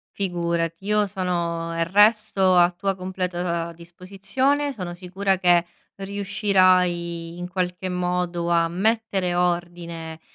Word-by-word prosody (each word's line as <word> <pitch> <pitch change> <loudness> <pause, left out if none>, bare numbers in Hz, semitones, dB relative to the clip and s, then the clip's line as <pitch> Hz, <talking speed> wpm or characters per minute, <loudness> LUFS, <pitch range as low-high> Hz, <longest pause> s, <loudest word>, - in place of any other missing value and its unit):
Figurati, 170 -2 -2
io 210 0 +2
sono 170 -3 -2 0.2
resto 205 -3 +4
a 175 0 +6
tua 195 +2 -2
completa 180 -2 -3
disposizione. 200 - -2
Sono 180 -7 -6
sicura 190 +2 -1
che 175 -2 +4 0.3
riuscirai, 185 -4 +1
in 175 0 -5
qualche, 180 0 -3
modo 180 -1 -1
a 170 -1 +3
mettere 190 0 0
ordine, 170 -2 -2
180 Hz, 105 wpm, -23 LUFS, 170-195 Hz, 0.3 s, a